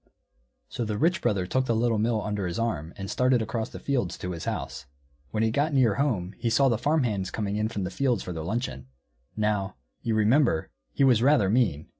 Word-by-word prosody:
So 120 - -4
the 105 -2 -2
Rich 175 - +2
Brother 95 -3 +1
took 130 +7 0
the 115 - +2
Little 115 -1 +1
Mill 110 -1 +1
under 105 -3 -2
his 85 - -4
arm 85 -9 -2
and 95 - -5
started 125 +3 +2
across 110 0 -3
the - - -9
fields 125 -10 -1
to 90 - -5
his 85 -2 -6
house. 65 - -4 0.4
When 110 0 -1
he 110 - +2
got 145 +5 0
near 120 -6 +4
home 100 -10 -1
he 115 - 0
saw 135 +4 +4
the 115 - 0
farm 155 0 +2
hands 100 -6 -1
coming 105 0 -3
in 105 +1 0
from 100 -3 -3
the 90 - -3
fields 125 -1 0
for 90 - -5
their 80 - -5
luncheon. 80 - -3 0.5
Now, 105 -2 0 0.3
you 115 - -1
remember, 110 - +2 0.2
he - - +1
was 125 -4 +5
rather 125 -7 +4
mean. 100 - +1
110 Hz, 220 wpm, -27 LUFS, 95-125 Hz, 0.5 s, was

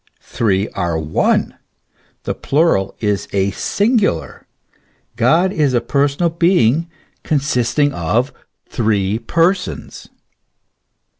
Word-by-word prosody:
Three 100 -2 0
are 85 -3 -2
one: 80 0 0 0.6
the - - -2
plural 145 - +1
is 105 -2 -1
a 100 0 +1
singular. 205 - -1 0.7
God 160 - +2
is 145 -5 +1
a - - +4
per 140 +4 +1
sonal 165 +4 -2
being 165 -3 +3 0.3
consisting 145 -1 0
of 110 - -1 0.4
three 105 -3 0
persons. 180 +6 -1
125 Hz, 95 wpm, -17 LUFS, 100-165 Hz, 0.7 s, a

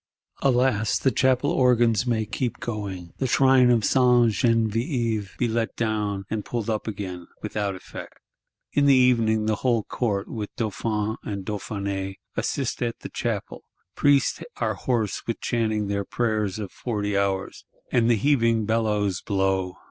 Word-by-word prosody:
Alas, 120 -6 +2
the 135 - +2
Chapel 130 +2 +2
organs 120 -2 +3
may 110 -2 +1
keep 120 +2 -3
going; 95 -7 -5
the 130 - 0
Shrine 130 0 +5
of 115 -4 +3
Sainte 125 -3 +4
Genevieve 115 - 0
be 120 - +1
let 115 0 -1
down, 105 -3 -1
and 110 -1 -3
pulled 115 0 -3
up 110 0 -3
again,—without 100 0 -4
effect. 95 - -10 0.6
In 145 0 +3
the 140 - +7
evening 115 -4 +3
the 110 -1 +1
whole 120 -3 +1
Court, 100 -5 -2
with 105 -3 -5
Dauphin 110 0 -2
and 100 -2 -5
Dauphiness, 100 -2 -3 0.2
assist 135 -4 -2
at 120 -1 -2
the - - -7
Chapel: - - -4 0.3
priests 145 -2 +3 0.2
are - - 0
hoarse 115 -5 -1
with 115 - -2
chanting 110 -3 0
their 100 0 -1
"Prayers 110 -3 -1
of 105 -3 -5
Forty 105 -4 -3
Hours;" 100 -1 -1 0.3
and 120 -2 +3
the 120 - +5
heaving 115 -3 +2
bellows 105 -4 0
blow. 95 -2 0
110 Hz, 150 wpm, -25 LUFS, 100-120 Hz, 0.6 s, the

